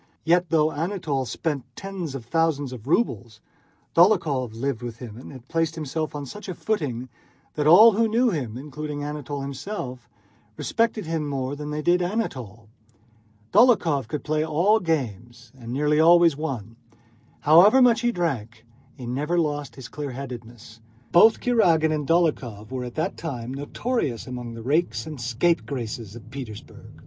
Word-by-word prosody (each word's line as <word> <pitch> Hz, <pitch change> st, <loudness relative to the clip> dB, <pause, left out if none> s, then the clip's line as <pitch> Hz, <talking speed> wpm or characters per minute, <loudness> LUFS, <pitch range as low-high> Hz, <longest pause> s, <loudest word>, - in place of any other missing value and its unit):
Yet, 175 Hz, +1 st, +3 dB
though 155 Hz, -1 st, +3 dB
Anatole 155 Hz, -5 st, -2 dB
spent 140 Hz, +4 st, -3 dB
tens 185 Hz, -7 st, -6 dB
of 125 Hz, -4 st, -7 dB
thousands 145 Hz, -2 st, 0 dB
of 120 Hz, -1 st, -10 dB
rubles, 115 Hz, -, 0 dB, 0.6 s
Dólokhov 160 Hz, -, +3 dB
lived 130 Hz, 0 st, -2 dB
with 120 Hz, -2 st, -6 dB
him 115 Hz, -4 st, -9 dB
and 125 Hz, -, -10 dB
had 130 Hz, -2 st, -12 dB
placed 165 Hz, +1 st, 0 dB
himself 155 Hz, 0 st, -3 dB
on 145 Hz, -1 st, -4 dB
such 210 Hz, +8 st, -9 dB
a 180 Hz, -, -4 dB
footing 140 Hz, -, -2 dB, 0.5 s
that 150 Hz, -1 st, 0 dB
all 210 Hz, +8 st, +9 dB
who 225 Hz, +2 st, +2 dB
knew 235 Hz, +2 st, +2 dB
them, 125 Hz, -, -3 dB
including 145 Hz, +1 st, -6 dB
Anatole 145 Hz, -1 st, -5 dB
himself, 135 Hz, -, -6 dB, 0.5 s
respected 230 Hz, -3 st, 0 dB
him 160 Hz, -2 st, -2 dB
more 135 Hz, 0 st, -3 dB
than 150 Hz, +1 st, -6 dB
they 150 Hz, 0 st, -3 dB
did 175 Hz, +2 st, +3 dB
Anatole. 130 Hz, -, -3 dB, 0.9 s
Dólokhov 180 Hz, -, +4 dB
could 150 Hz, +4 st, -4 dB
play 155 Hz, 0 st, 0 dB
all 170 Hz, +8 st, +3 dB
games 120 Hz, -, -3 dB
and 120 Hz, -3 st, -9 dB
nearly 150 Hz, +3 st, +1 dB
always 170 Hz, -1 st, +6 dB
won. 120 Hz, -8 st, -5 dB, 0.6 s
However 175 Hz, -, +7 dB
much 240 Hz, -3 st, +5 dB
he 240 Hz, 0 st, +2 dB
drank, 120 Hz, -, -3 dB, 0.3 s
he 125 Hz, -, -8 dB
never 145 Hz, +8 st, -1 dB
lost 145 Hz, -4 st, -1 dB
his 130 Hz, -4 st, -9 dB
clearheadedness. 120 Hz, -5 st, -8 dB, 0.3 s
Both 220 Hz, +6 st, +6 dB
Kurágin 165 Hz, -10 st, +3 dB
and 150 Hz, -2 st, -2 dB
Dólokhov 130 Hz, -11 st, 0 dB
were 130 Hz, -1 st, -3 dB
at 120 Hz, -, -8 dB
that 160 Hz, -, -2 dB
time 130 Hz, -6 st, -5 dB
notorious 145 Hz, -, -2 dB
among 125 Hz, -2 st, -6 dB
the 115 Hz, -, -8 dB
rakes 155 Hz, +8 st, 0 dB
and 155 Hz, -5 st, -7 dB
scapegraces 120 Hz, -, -1 dB
of 120 Hz, 0 st, -12 dB
Petersburg. 125 Hz, -6 st, -9 dB
145 Hz, 155 wpm, -24 LUFS, 125-170 Hz, 0.9 s, all